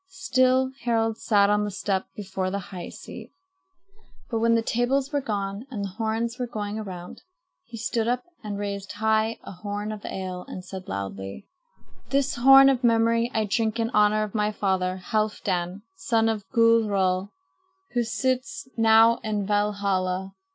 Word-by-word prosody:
Still 260 -8 +2
Harald 225 -2 +1
sat 205 -2 +3
on 210 0 +2
the 210 - -2
step 190 -1 -1
before 190 -2 -3
the 200 - -2 0.2
high 180 -2 -6
seat. - - -10 1.0
But 225 - 0
when 230 +1 +3
the 230 - +2
tables 260 +5 0
were 285 - +1
gone 205 0 -3
and 215 -6 -4
the - - -4
horns 225 +4 -2
were 250 - -1
going 210 -2 -4
around, 180 -4 -8 0.4
he 235 - -9
stood 225 0 -1
up 250 +1 0 0.2
and 205 -1 -4
raised 200 -1 -4
high 220 +1 +1
a - - -8
horn 205 +3 -5
of 215 -1 -7
ale 185 -1 -5
and 185 - -8
said 185 0 -8
loudly: 95 - -5 0.6
"This 275 -1 +1
horn 270 +2 +8
of 265 -2 +2
memory 230 0 +3
I 220 -3 0
drink 220 +2 0
in 230 +1 0
honor 210 0 +3
of 210 - -5
my 210 -1 +1
father, 190 -3 0
Halfdan, 200 -3 -1
son 225 +7 +1
of 215 -3 -3
Gudrod, 205 -6 +3 0.7
who 245 - +2
sits 255 +3 -2
now 225 0 +6
in 210 -2 -2
Valhalla. 195 -2 0
215 Hz, 160 wpm, -25 LUFS, 195-230 Hz, 1.0 s, horn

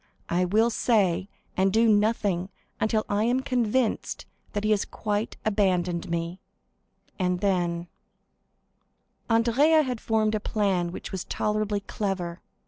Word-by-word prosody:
I 180 +2 +2
will 220 +6 +3
say 200 -5 +1 0.3
and 190 +1 +2
do 225 +3 +4
nothing 205 -4 +2 0.3
until 215 0 +1
I 205 +2 +1
am 250 +2 +2
convinced 250 -2 0 0.3
that 205 - -2
he 215 - +2
has 205 -2 +3
quite 210 0 -3
abandoned 180 -5 +1
me, 170 +2 -3 0.8
and 180 -1 +1
then——" 175 -3 0 1.4
Andrea 250 +8 +4
had 250 -4 -3
formed 220 -1 +1
a 215 - +1
plan 195 -5 0
which - - -7
was 190 -2 -3
tolerably 210 -1 -1
clever. 190 -4 -3
205 Hz, 130 wpm, -26 LUFS, 180-225 Hz, 1.4 s, do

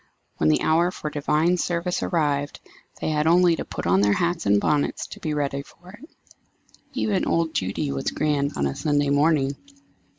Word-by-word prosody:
When 75 - +2
the 75 - +2
hour 170 +3 +3
for 155 -4 -6
divine 155 +4 +1
service 175 0 -1
arrived, 145 -3 -1 0.4
they - - -2
had 150 0 +1
only 175 0 +5
to - - -3
put - - -6
on 90 +3 +3
their 105 0 +3
hats 170 - -1
and 100 0 +4
bonnets 145 +6 0
to - - -10
be 155 -1 -3
ready 140 -1 -1
for 175 +5 -16
it. 245 - -14 0.8
Even 215 -7 0
old 165 -1 0
Judy 100 +10 -2
was 135 -1 -2
grand 145 -2 0
on 70 - 0
a 70 - -1
Sunday 145 -1 0
morning. 145 -1 +2
150 Hz, 185 wpm, -24 LUFS, 140-170 Hz, 0.8 s, only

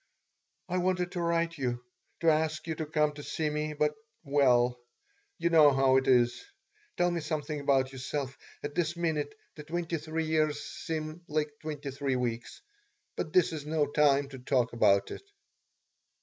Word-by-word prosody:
"I 180 0 0
wanted 180 -1 0
to 175 - -3
write 170 -1 0
you, 125 -2 -2 0.4
to 165 -1 +5
ask 155 0 0
you 165 - -2
to 155 0 -4
come 150 -1 +2
to 145 0 -9
see 155 +1 -2
me, 150 0 -2
but 150 0 +1 0.3
well, 125 -4 +3 0.6
you 170 - 0
know 155 -3 +7
how 135 -1 +4
it 130 - +1
is. 120 -2 +3 0.5
Tell 175 0 +3
me 170 -1 -2
something 155 -1 -3
about 135 -2 +2
yourself. 135 +1 -4 0.3
At 145 0 -4
this 170 0 -1
minute 155 -4 -1 0.2
the 150 - -7
twenty 170 +1 -3
three 160 +1 -3
years 155 -2 +1
seem 155 +1 -5
like 150 0 -1
twenty 150 -3 -5
three 135 0 -1
weeks. 120 - -3 0.5
But - - -3
this 365 - +3
is 150 -2 -6
no 155 -1 +2
time 145 -1 +3
to 135 -2 -9
talk 125 -2 +1
about 100 -4 +3
it. - - -6
150 Hz, 170 wpm, -30 LUFS, 135-160 Hz, 0.6 s, know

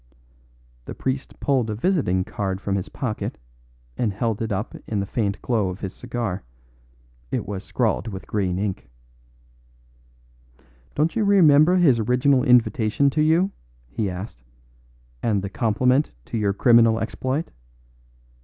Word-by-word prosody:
The - - -7
priest 130 +1 -4
pulled 130 -5 +1
a 105 - -2
visiting 120 - +1
card 95 0 -3
from 100 0 -3
his 95 - -3
pocket 115 -5 -4 0.6
and 115 -4 0
held 110 +2 -2
it 115 -1 -2
up 105 +4 -3
in 105 - -1
the 100 - -1
faint 100 -1 -2
glow 110 -6 +1
of 90 +2 -7
his 95 -2 -4
cigar; 115 -6 -4 0.9
it - - -2
was 100 -1 -5
scrawled 115 0 -1
with 95 -3 -6
green 95 -4 -1
ink. 100 -1 -3 2.1
"Don't 155 +2 +1
you 225 - +1
remember 175 -4 +5
his 150 -10 +4
original 125 +4 +3
invitation 125 +1 +3
to 150 - 0
you?" 165 +5 +3 0.4
he 100 - -1
asked, 90 - -7 0.8
"and 105 -4 0
the 100 - -5
compliment 125 +6 +1
to - - -4
your 100 -2 +1
criminal 115 +1 +5
exploit? 130 +7 -3
115 Hz, 140 wpm, -23 LUFS, 100-135 Hz, 2.1 s, remember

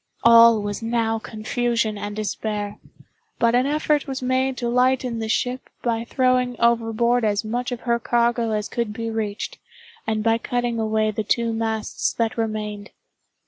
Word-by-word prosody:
All 230 -2 +7
was 205 +1 -4
now 225 -1 0
confusion 225 0 -1
and 205 0 -5
despair—but 215 - -4
an 250 +2 +3
effort 300 0 +1
was 270 -1 -3
made 260 +1 0
to 240 - -2
lighten 250 -1 +1
the 220 -1 -3
ship 250 +3 -1
by 230 -1 -1
throwing 255 -1 +1
overboard 235 +1 +2
as 210 0 +1
much 245 +3 -2
of 245 - -4
her 235 -1 0
cargo 235 0 +1
as 215 -1 -1
could 235 -3 -3
be 230 +1 -4
reached, 215 -2 -4 0.5
and 215 -1 0
by 225 0 +2
cutting 240 -1 -2
away 220 0 +1
the 220 +1 -3
two 230 +2 0
masts 225 -1 -2
that 230 -1 -1
remained. 215 -2 -3
230 Hz, 155 wpm, -23 LUFS, 220-245 Hz, 0.5 s, All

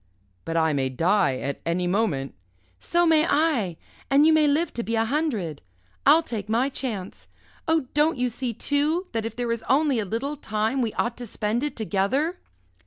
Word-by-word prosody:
"But 165 0 -2
I 160 -1 +2
may 135 -2 0
die 165 +1 +2
at 140 +1 -4
any 175 +2 -1
moment." 175 -8 0 0.5
"So 345 - +2
may 320 -2 +5
I! 260 - +1 0.3
And 280 +2 +5
you 320 - +6
may 310 -1 +4
live 305 +3 +1
to 235 - -3
be 230 0 -2
a 225 0 +2
hundred 225 - -2 0.5
I'll 315 +4 +7
take 215 -8 -5
my 240 +5 +2
chance. 225 -9 -5 0.4
Oh, 320 -3 +2
don't 300 +1 +2
you 250 0 +1
see, 245 +1 -3
too, 295 - 0
that 225 -1 -2
if 225 -1 -5
there 245 -1 -2
is 230 -1 -2
only 280 -2 +3
a 210 - -1
little 255 +9 -3
time 220 +1 -1
we 230 -3 0
ought 235 0 -1
to 245 - -7
spend 215 +3 -2
it 295 +1 -3
together?" 230 - 0
235 Hz, 190 wpm, -25 LUFS, 200-295 Hz, 0.5 s, I'll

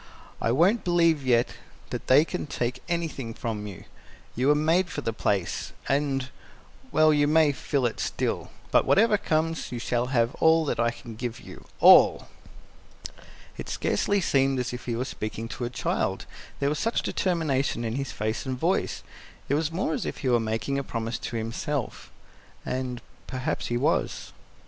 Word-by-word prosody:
"I 115 - +1
won't 180 - +3
believe 170 -4 +3
yet 120 -2 +2 0.3
that - - -5
they 140 +5 +6
can - - -4
take 120 -3 -3
anything 155 -9 -3
from 105 -3 -4
you. 95 -4 -9 0.5
You 125 +3 +1
were 150 - +5
made 165 +5 +2
for 145 - -4
the 115 - -2
place, 100 -4 -1
and 135 -2 0 0.6
well, 155 0 +5
you 145 -1 +3
may 155 -1 +4
fill 140 -1 -1
it 115 - -2
still. - - -2 0.2
But - - +4
whatever 215 +2 +4
comes, 165 -3 -1
you 125 - -3
shall 120 +1 -1
have 120 -1 +1
all 160 0 +5
that - - -2
I 120 0 +3
can 120 -1 -9
give 120 +1 -4
you - - -12
all!" - - +7 1.3
It - - -6
scarcely 205 0 +1
seemed 135 -5 +2
as 125 -1 -2
if 125 - -7
he 120 - -2
were 125 +3 -2
speaking 110 -2 -5
to 120 - -4
a - - -3
child, 120 - -2 0.3
there 140 - +1
was 150 - -2
such 230 +1 0
determination 140 -9 0
in 110 - -2
his 135 0 -3
face 110 +1 -2
and 130 -1 -2
voice; - - 0 0.5
it - - +2
was 155 +2 +1
more 165 -1 -1
as - - -2
if - - -4
he - - +3
were 120 -1 +4
making 115 +5 -1
a - - -3
promise 115 -2 -3
to 120 - -5
himself 115 +4 -3 0.5
and 125 -1 -3 0.2
perhaps 130 -1 -3
he 120 - -1
was. - - -1
130 Hz, 175 wpm, -26 LUFS, 120-155 Hz, 1.3 s, all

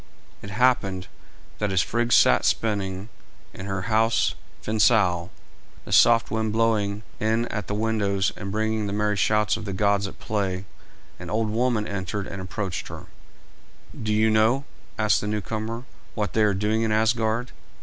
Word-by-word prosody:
It 100 - -8
happened 100 -4 +1 0.5
that 105 -2 0
as 95 -2 +3
Frigg 120 +1 -1
sat - - +5
spinning 100 -2 -1 0.4
in 95 - -8
her 95 -1 -3
house 110 +2 +2 0.3
Fensal, 105 -6 +2 0.6
the - - -9
soft 115 -1 +5
wind 110 -1 0
blowing 105 -2 0 0.2
in 110 +2 +1
at 105 -4 -4
the 105 - -2
windows 105 -3 0
and 100 -1 -6
bringing 110 0 -1
the 100 - -3
merry 105 0 +1
shouts 105 +1 +2
of 110 - -7
the 100 - -4
gods 100 +1 +1
at - - -10
play, 95 -3 -2 0.5
an 90 0 -8
old 110 +2 0
woman 115 -2 0
entered 100 +1 -3
and 100 -1 -6
approached 95 0 -4
her. - - -9 0.9
"Do 110 -1 -4
you 110 +1 +3
know," 115 +6 +3 0.3
asked 110 -1 +2
the 105 - -4
newcomer, 110 +2 -3 0.3
"what 105 -2 -2
they 110 - +2
are 100 -2 +2
doing 105 +3 0
in 110 -1 0
Asgard? 110 +2 +1
105 Hz, 160 wpm, -24 LUFS, 100-110 Hz, 0.9 s, sat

